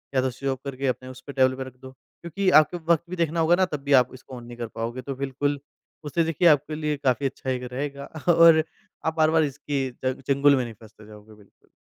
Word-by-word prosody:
या 130 - +4
तो 130 - 0
switch 135 +3 -4
off 130 - -4
करके 135 0 -3
अपने 130 0 -3
उसपे 130 +2 -10
टेबल 130 -1 +3
पे 135 - -5
रख 130 -1 -11
दो। 130 - -10
क्योंकि 170 +8 -4
आपको 165 +4 -5 0.2
वक़्त 165 - -1
भी 185 - -4
देखना 165 -1 -1
होगा 165 +2 +4
ना, 185 0 +2
तब 150 -5 -5
भी 140 0 +1
आप 125 - -6
इसको 130 0 -11
ऑन 120 - -9
नहीं 120 0 -11
कर 120 -1 -4
पाओगे। 115 +3 -4
तो 135 +1 -6
बिल्कुल, 140 +1 -2 0.4
उससे 160 +3 0
देखिए, 165 +2 +2
आपके 150 0 +3
लिए 150 -1 -2
काफ़ी 130 +1 +1
अच्छा 135 0 -4
एक 125 -1 -2
रहेगा 140 +1 -4 0.3
और 165 -1 +7 0.4
आप 160 - 0
बार-बार 160 0 +4
इसकी 140 -1 -3 0.2
च 130 0 +1
चंगुल 140 +1 +4
में 130 - 0
नहीं 120 -2 -7
फँसते 110 -1 -16
जाओगे, 105 0 -14
बिल्कुल। 105 -2 -24
140 Hz, 240 wpm, -25 LUFS, 130-155 Hz, 0.4 s, और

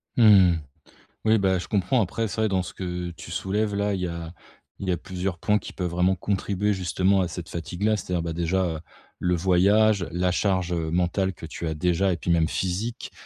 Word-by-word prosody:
Mmh 120 - +4 0.3
mh. 80 - -2 0.7
Oui, 110 0 +5
bah, 95 -2 +2
je - - -7
comprends 110 +5 +2
après 110 +3 -1
c'est 110 - -5
vrai 110 - +3
dans 95 -1 +1
ce - - -8
que 90 -1 -4
tu 85 - -11
soulèves 105 +2 -1
là, 100 0 0
il 95 - -2
y 90 - 0
a 85 -1 -6 0.5
il 95 - -4
y - - +2
a - - -1
plusieurs 90 +1 -4
points 105 +4 +2
qui - - -9
peuvent 90 -2 -2
vraiment 90 +2 +2
contribuer 100 +2 -1
justement 95 +1 +1
à 90 - +1
cette 85 0 -7
fatigue-là, 90 +6 -1
c'est-à-dire, 90 -3 -2
bah, 85 - -3
déjà, 85 +3 0
heu, - - -8 0.4
le 90 0 +2
voyage, 95 +3 +3
la 90 +1 +1
charge, 90 -2 0
heu, 80 -2 -1
mentale 90 +3 0
que 80 - -10
tu 80 +1 -5
as 80 - -1
déjà 90 +4 +1
et - - -3
puis 85 +2 -2
même 80 -1 +3
physique 95 +8 -3
90 Hz, 220 wpm, -25 LUFS, 85-100 Hz, 0.7 s, Oui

